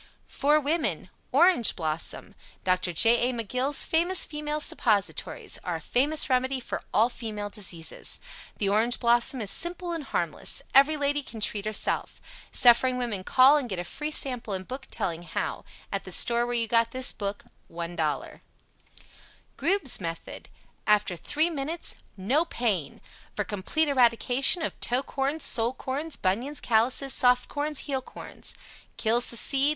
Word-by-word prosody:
FOR 295 +2 +2
WOMEN 305 +3 -2 0.2
ORANGE 350 - +4
BLOSSOM 160 -2 -3 0.3
Dr. 185 -1 +1
J. 235 +7 +4
A. - - -3
McGill's 255 +5 -1
Famous 345 +3 +1
Female 300 0 -4
Suppositories 210 -8 -1
Are - - -3
a - - -4
famous 290 +5 +3
remedy 260 +1 +1
for 245 - -5
all 225 - +4
female 215 -4 -6
diseases. 175 -6 -3 0.4
The 200 - -1
Orange 220 +5 +3
Blossom 240 +1 +3
is 200 -2 0
simple 350 +1 0
and 330 -3 -3
harmless. - - -1
Every 285 +3 +5
lady 290 0 0
can 230 -5 -9
treat 210 -1 -1
herself. 215 -1 -1 0.3
Suffering 250 +1 +5
women 230 -6 -3
call 265 +8 +6
and 265 -5 -3
get 190 - -4
a 175 - -3
free 300 - -5
sample 250 -8 -1
and 185 0 -7
book 265 +1 -7
telling 170 -2 -3
how 170 -2 -4 0.3
At - - -3
the - - -10
store 240 0 +3
where 245 - -2
you 230 -1 +1
got 230 0 +2
this 255 +1 +3
book. 200 0 -5 0.3
$1.00 170 -2 -3 1.2
Grube's 320 - +2
Method 165 -1 -7 0.4
After 210 -3 +2
3 310 - 0
minutes, 315 +3 -3 0.2
no 250 - +1
pain! 210 - -2 0.3
For 210 - 0
Complete 205 +11 -1
Eradication 255 +4 +2
of - - -4
TOE 250 +3 +1
CORNS, 280 +4 -3
SOLE 230 +1 +1
CORNS, 290 +5 -4
BUNIONS, 235 +10 -1
CALLOUSES, 250 +4 +2
SOFT 250 -1 +3
CORNS, 295 0 -2
HEEL 270 -3 -2
CORNS. - - -8 0.4
Kills 235 +2 +1
the 235 - -2
Seed. 275 +4 +3
245 Hz, 155 wpm, -27 LUFS, 210-285 Hz, 1.2 s, call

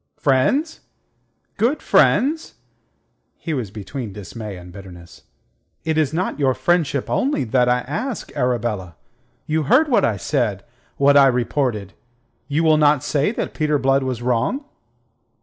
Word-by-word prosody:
"Friends! 265 - +1 0.8
Good 250 +7 0
friends?" 310 +5 +2 0.8
He 165 - -4
was 125 -8 -3
between 105 +2 -7
dismay 105 0 -8
and 90 0 -12
bitterness. 90 -3 -12 0.6
"It 160 -1 0
is 155 -3 +1
not 170 0 -2
your 135 -3 +2
friendship 165 -6 0
only 275 - 0
that 125 +1 +2
I 125 0 +2
ask, 220 - -5
Arabella. 115 -8 -2 0.5
You 155 +1 0
heard 285 - +4
what 245 - +3
I 110 -3 +1
said, 105 -5 -1 0.3
what 140 +1 +4
I 140 -1 +7
reported. 120 -5 -1 0.5
You 150 +3 0
will 155 -1 +4
not 150 -3 +3
say 145 +6 0
that - - -4
Peter 150 -1 +1
Blood 135 0 +2
was 130 -3 -3
wrong?" 125 - 0
135 Hz, 140 wpm, -21 LUFS, 115-155 Hz, 0.8 s, I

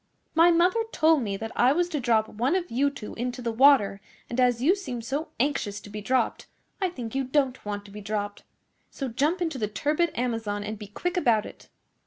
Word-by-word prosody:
My 330 +2 +6
mother 350 +6 +3
told 315 - +4
me 200 -4 -2
that 225 +2 -5
I 250 +3 +4
was 350 +3 +1
to 310 -4 -2
drop 225 -3 +2
one 245 - 0
of 355 -2 -2
you 275 +5 +2
two 235 -6 -8
into 245 +2 -4
the 235 -1 -2
water, 225 -5 +5 0.3
and 240 - -2
as 245 -2 +3
you 315 +10 +4
seem 315 -12 -5
so 285 +7 -3
anxious 235 -7 0
to 205 - -13
be 210 0 -5
dropped 255 +5 0 0.3
I 375 - +2
think 245 -10 -7
you 270 0 0
don't 265 -1 0
want 205 -1 -4
to 200 - -13
be 210 +1 -8
dropped. 205 0 -3 0.5
So 270 -2 -5
jump 300 +10 0
into 320 -6 -3
the 210 - 0
turbid 300 +9 0
Amazon 225 -4 -2
and 215 0 -5
be 210 - -8
quick 355 - -3
about 230 -10 +3
it. - - -12
250 Hz, 220 wpm, -26 LUFS, 215-300 Hz, 0.5 s, My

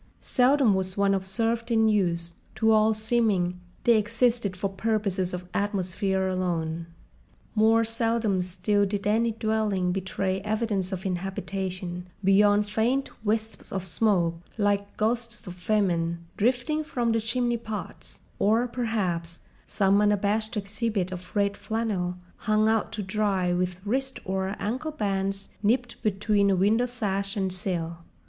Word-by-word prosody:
Seldom 255 -3 +3
was 190 0 -1
one 200 0 +3
observed 225 +5 -1
in 225 -1 +4
use: 170 -5 +1 0.2
to 220 0 +3
all 215 0 +5
seeming 215 -5 +1 0.2
they 235 -2 +5
existed 225 -2 +1
for 195 - 0
purposes 195 -2 -1
of 180 0 -5
atmosphere 190 -1 0
alone. 170 -3 -2 0.7
More 225 +1 +4
seldom 225 -3 +1
still 195 +3 +1
did 200 0 -3
any 225 +3 +2
dwelling 215 -5 0
betray 190 0 -1
evidence 210 -2 -1
of 190 0 -4
inhabitation 185 -1 -4 0.2
beyond 205 +2 +4
faint 240 +6 0
wisps 220 -1 -2
of 190 -1 -3
smoke, 175 -3 +1 0.2
like 205 -1 0
ghosts 230 +1 -1
of 180 - -6
famine, 175 -3 0
drifting 255 +7 +1
from 240 -6 -1
the 225 - +2
chimneypots, 230 -1 -3 0.2
or—perhaps—some 205 -4 0
unabashed 210 +1 +1
exhibit 205 -2 -2
of 180 +2 -8
red 200 -1 +2
flannel 205 -6 -2 0.2
hung 215 0 +2
out 220 -1 +1
to 210 - -3
dry 190 -3 0
with 180 +1 -2
wrist 265 +5 -1
or 190 +1 -1
ankle 255 +9 -2
bands 195 -5 -2
nipped 235 +3 0
between 205 0 +2
a 195 - +3
window 215 +6 +3
sash 200 -4 -2
and 190 -2 0
sill. 170 -3 -3
205 Hz, 130 wpm, -27 LUFS, 185-225 Hz, 0.7 s, all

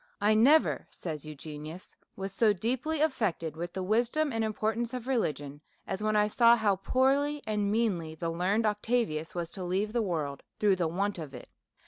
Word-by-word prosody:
" - - -38
1 215 +2 +3
never," 300 +6 +4
says 155 -4 -6
Eugenius, 155 +3 -9
'' - - -51
was 195 0 -4
so 210 +2 +3
deeply 255 - -1
affected 210 - 0
with 175 +2 -5
the 190 -1 -3
wisdom 240 +8 +1
and 225 0 0
importance 220 +3 -1
of 245 -2 -5
religion 150 - -2 0.2
as 190 +1 -4
when 215 0 +1
I 210 0 +4
saw 235 +2 +5
how 210 -4 +2
poorly 275 +7 +1
and 210 -2 0
meanly 190 -8 0
the 165 +1 -3
learned 190 +6 +1
Octavius 210 -7 0
was 170 -1 -3
to 190 - -6
leave 195 +4 -1
the 240 - +2
world 155 -8 -2 0.2
through 200 -3 +3
the 175 -2 +1
want 195 +3 -1
of 145 -4 -7
it. 125 - -10
205 Hz, 190 wpm, -30 LUFS, 170-230 Hz, 0.2 s, saw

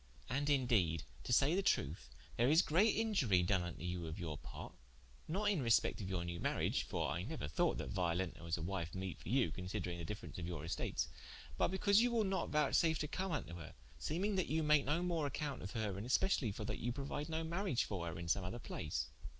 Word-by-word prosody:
And 140 +3 0
in 135 -3 +3
deede 90 - +2 0.2
to - - -3
say 135 +5 +5
the 195 - +3
truth, 70 - 0 0.3
there 120 +3 +3
is 160 +5 +6
great 195 +8 +4
iniurie 140 - +3
doen 95 0 +3
vnto 90 +1 -3
her 85 - -4
of 80 - -6
your 80 -4 -3
parte, - - -8 0.5
not 190 +6 -1
in 185 -8 +1
respecte 115 -1 +3
of 95 - -4
your 90 -2 -1
new 85 0 -4
mariage: - - +1
(for - - -2
I - - -1
neuer 75 - -4
thought 75 - +1
that - - -4
Violenta 90 -1 -1
was 85 0 -1
a 80 - -4
wife 85 -1 -3
meete 95 -2 -4
for - - -8
you, 125 +1 +3
considering 90 -1 -4
the - - -4
difference 105 +2 -6
of 85 - -4
your 80 -3 -4
estates) 85 - -1 0.5
but - - +3
because 200 +3 +4
you 245 0 +3
wil 230 -2 +3
not 190 -2 0
vouchsafe 155 +2 +3
to 150 - -2
come 190 +5 -2
vnto 140 - -3
her, 80 - -9 0.2
seeming 185 - 0
that 185 - +1
you 160 +1 +1
make 150 -1 +4
no 155 +5 +1
more 165 -5 0
accompte 140 0 -3
of 95 - -6
her 110 -5 -1
and 110 - -5
speciallye 130 - +2
for 110 - -4
that - - -3
you 120 - -1
prouide 140 +4 -4
no 160 0 -1
mariage 170 - 0
for 90 -4 -3
her 80 - -4
in 85 0 -5
som 95 +3 +2
other 90 +6 -4
place. 70 - -3
115 Hz, 230 wpm, -37 LUFS, -, 0.5 s, is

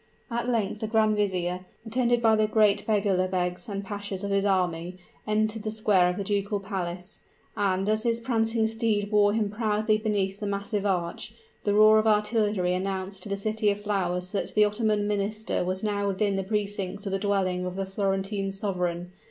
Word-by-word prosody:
At 235 +1 -1
length 215 -3 0
the 220 - -2
grand 215 -1 +3
vizier, 185 -3 -1 0.2
attended 240 +1 +1
by 220 -1 +5
the 215 0 +2
great 210 -2 +3
beglerbegs 185 -2 0
and 200 -1 -4
pashas 200 -1 -5
of 200 - -2
his 200 0 +2
army, 180 -2 0 0.3
entered 215 +1 0
the 215 - -3
square 210 -4 +3
of 180 - -3
the 200 - -2
ducal 205 0 -1
palace; 180 -3 -4 0.4
and 195 -1 0
as 215 0 +2
his 230 0 +1
prancing 225 -2 +1
steed 220 -2 0
bore 205 -1 +4
him 210 -2 0
proudly 215 0 +1
beneath 200 -3 -1
the 210 - -3
massive 200 +1 -2
arch, 175 -3 -2 0.3
the 205 -1 +2
roar 215 +1 +7
of 215 - +1
artillery 210 -3 +2
announced 190 +1 -3
to 210 - -7
the 200 - -1
City 215 +1 0
of 200 0 -1
Flowers 180 -3 -1
that 205 - -3
the 210 0 +6
Ottoman 210 0 0
Minister 210 +1 -1
was 185 +2 -3
now 205 -1 0
within 200 +1 0
the 195 - -1
precincts 200 -1 -2
of 195 - -2
the 195 - 0
dwelling 190 -3 0
of 180 - -5
the 195 0 -2
Florentine 195 0 -1
sovereign. 180 -3 -2
205 Hz, 185 wpm, -27 LUFS, 190-215 Hz, 0.4 s, roar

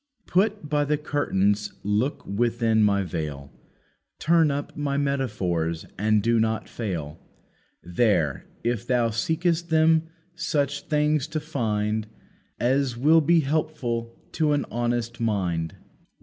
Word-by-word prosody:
"Put 200 -2 +1
by 145 0 +1
the 150 +1 +1
curtains, 105 -9 0
look 105 +8 0
within 115 +1 +1
my 100 -2 +3
veil, 75 -5 -5 0.6
Turn 165 -1 +3
up 145 0 -3
my 140 -2 -1
metaphors, 100 - -1
and 105 +1 +2
do 115 0 +3
not 110 0 0
fail, 85 -8 -5 0.6
There, 85 - +1 0.2
if 120 0 -1
thou 120 -2 +2
seekest 165 +8 0
them, 160 0 +3 0.2
such 145 -4 -1
things 150 -1 +1
to 155 0 -3
find, 110 -7 -1 0.5
As 130 0 +1
will 155 +6 +5
be 165 +2 +4
helpful 135 -6 -2
to 155 -2 +1
an 145 - 0
honest 120 0 -1
mind." 90 -8 -1
120 Hz, 120 wpm, -25 LUFS, 105-150 Hz, 0.6 s, will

